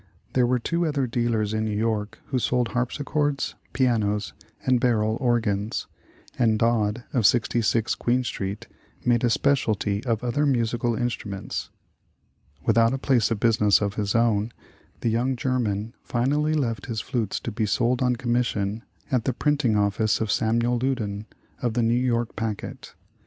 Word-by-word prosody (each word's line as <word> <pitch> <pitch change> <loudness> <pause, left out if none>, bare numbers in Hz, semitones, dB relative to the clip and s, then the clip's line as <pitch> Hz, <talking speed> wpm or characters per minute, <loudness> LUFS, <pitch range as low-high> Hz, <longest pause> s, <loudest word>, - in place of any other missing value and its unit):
There 125 -2 +3
were 125 +1 +2
two 170 +7 -1
other 145 -3 0
dealers 115 -3 0
in 110 0 0
New 105 -1 -1
York 110 -1 -1
who 130 - +1
sold 125 -1 +1
harpsichords, 145 +3 -1 0.2
pianos, 110 -5 +1 0.3
and 130 -1 +3
barrel 110 -3 +2
organs; 110 -4 0 0.5
and 110 -3 +3
Dodd, 115 0 +1
of 120 -7 +4
66 115 -1 +2
Queen 125 +2 +1
Street, 100 -3 -4 0.4
made 120 -1 +3
a 120 - +4
specialty 110 -6 +1
of 115 -1 0
other 145 +5 +1
musical 120 -2 +1
in 120 +2 0
struments. 100 -4 -5 1.0
Without 115 +2 +4
a - - -2
place 130 -4 +2
of 115 - -1
business 105 -3 +4
of 100 -1 -1
his 105 -1 -2
own, 115 -1 +2 0.5
the 115 - +1
young 125 +4 +1
German 115 -4 -1
finally 145 +6 0
left 115 -8 -1
his 115 -3 -2
flutes 115 -6 -2
to 115 - -5
be 110 0 -1
sold 120 +5 +1
on 125 -1 +2
com 120 0 -3
mission 110 -3 0 0.3
at 125 -4 +1
the 130 - +1
printing 145 -4 +1
office 105 +1 +1
of 110 -1 -1
Samuel 120 0 +1
Loudon, 110 -6 -2 0.3
of 120 -3 -1
the 120 - +2
"New 115 +1 +3
York 120 -2 0
Packet." 110 -2 -5
115 Hz, 160 wpm, -25 LUFS, 110-125 Hz, 1.0 s, of